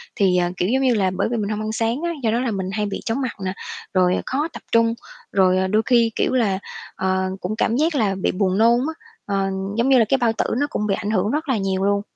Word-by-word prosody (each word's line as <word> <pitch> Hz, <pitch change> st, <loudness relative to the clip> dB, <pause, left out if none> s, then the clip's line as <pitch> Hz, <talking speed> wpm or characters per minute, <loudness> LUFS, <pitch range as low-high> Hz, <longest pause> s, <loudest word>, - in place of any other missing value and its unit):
Thì, 190 Hz, -3 st, +3 dB
ờ, 175 Hz, 0 st, +1 dB
kiểu 180 Hz, -, 0 dB
giống 260 Hz, +3 st, +2 dB
như 260 Hz, -2 st, +3 dB
là, 190 Hz, -3 st, +1 dB
bởi -, -, +1 dB
vì 240 Hz, -, 0 dB
mình 205 Hz, -2 st, -2 dB
hông 215 Hz, 0 st, -2 dB
ăn 215 Hz, 0 st, -3 dB
sáng 230 Hz, +4 st, -1 dB
á, 345 Hz, 0 st, -1 dB
do 225 Hz, -, +2 dB
đó 230 Hz, -, +1 dB
là 250 Hz, -2 st, -1 dB
mình 190 Hz, -2 st, -3 dB
hay 210 Hz, +1 st, -1 dB
bị 200 Hz, -, -4 dB
chóng 230 Hz, +5 st, -1 dB
mặt 255 Hz, -3 st, -3 dB
nè, 185 Hz, -, -1 dB, 0.4 s
rồi 185 Hz, -1 st, +3 dB
khó 290 Hz, +4 st, -1 dB
tập -, -, -8 dB
trung, 230 Hz, 0 st, +4 dB, 0.4 s
rồi, 185 Hz, -2 st, +3 dB
ờ, 190 Hz, 0 st, +1 dB
đôi 210 Hz, +3 st, +2 dB
khi, 235 Hz, -3 st, +3 dB
kiểu -, -, 0 dB
là, 210 Hz, -7 st, +1 dB, 0.4 s
ờ, 190 Hz, 0 st, 0 dB
cũng 195 Hz, +4 st, -3 dB
cảm 225 Hz, +1 st, +1 dB
giác 310 Hz, +4 st, +1 dB
là 210 Hz, -7 st, +1 dB
bị -, -, +1 dB
buồn 185 Hz, 0 st, 0 dB
nôn 230 Hz, +2 st, +5 dB
á. 320 Hz, -, -3 dB, 0.3 s
Ờ, 195 Hz, -1 st, 0 dB, 0.3 s
giống 235 Hz, +3 st, +2 dB
như 265 Hz, -, +6 dB
là 230 Hz, -, +5 dB
cái 270 Hz, -, +4 dB
bao 240 Hz, -3 st, +2 dB
tử -, -, -1 dB
nó 290 Hz, -, +1 dB
cũng 210 Hz, -, -2 dB
bị 195 Hz, -, +1 dB
ảnh 210 Hz, 0 st, -3 dB
hưởng 205 Hz, 0 st, +1 dB
rất 305 Hz, +1 st, -2 dB
là 260 Hz, -, +2 dB
nhiều 190 Hz, -1 st, -1 dB
luôn. 200 Hz, 0 st, +2 dB
215 Hz, 280 wpm, -21 LUFS, 190-240 Hz, 0.4 s, như